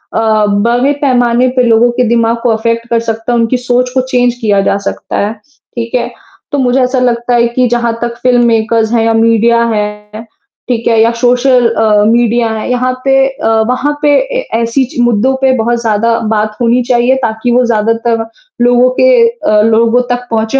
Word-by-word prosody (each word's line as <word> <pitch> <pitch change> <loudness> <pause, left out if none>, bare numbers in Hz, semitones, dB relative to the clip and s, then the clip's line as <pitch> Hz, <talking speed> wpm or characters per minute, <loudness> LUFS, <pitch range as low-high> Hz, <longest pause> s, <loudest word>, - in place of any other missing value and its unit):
अ, 220 -1 +1 0.2
बड़े 245 +4 +1
पैमाने 245 -2 +1
पे 250 - +2
लोगों 235 0 +3
के 250 +1 -1
दिमाग़ 230 0 +1
को 245 - +1
अफेक्ट 230 +1 -1
कर 235 - +1
सकता 225 +1 -4
है, 240 - +1
उनकी 230 +2 0
सोच 250 0 -1
को 260 - +1
चेंज 245 -1 +1
किया 205 -3 +1
जा 195 - 0
सकता - - -5
है। 205 +2 -2 0.4
ठीक 230 -1 -5
है? 245 - -2 0.4
तो 285 - -1
मुझे 255 0 +1
ऐसा 255 +1 0
लगता 240 -1 0
है 235 0 +2
कि 255 -1 +2
जहाँ 235 -1 -1
तक 235 0 -3
फ़िल्म 245 -1 +3
मेकर्स 225 -1 0
है 230 -1 +2
या 225 - +1
मीडिया 230 +1 +2
है, 210 0 -5 0.5
ठीक 230 -2 -2
है, 230 -1 +2
या 230 - +3
सोशल 250 0 +2
अ, 215 -2 +1
मीडिया 235 0 +1
हैं 220 - -5
यहाँ 255 +1 -1
पे 270 0 +2
अ, 270 -4 -5 0.2
वहाँ 275 +4 -1
पे 295 - +2 0.3
ए, - - -6 0.2
ऐसी 230 +4 0
ची 245 - -2
मुद्दों 240 +2 +1
पे 265 -1 +3
बहुत 235 +1 -1
ज़्यादा 230 +1 0 0.2
बात 215 0 -2
होनी 240 +1 +2
चाहिए 245 +1 +2
ताकि 220 +2 -2
वो 250 +1 +2
ज़्यादातर 230 0 -1 0.4
लोगों 245 +1 +3
के - - +4 0.2
अ 215 - 0
,लोगों 230 +2 +2
तक 245 0 -3
पहुँचे। 225 +4 0
235 Hz, 195 wpm, -11 LUFS, 225-245 Hz, 0.5 s, के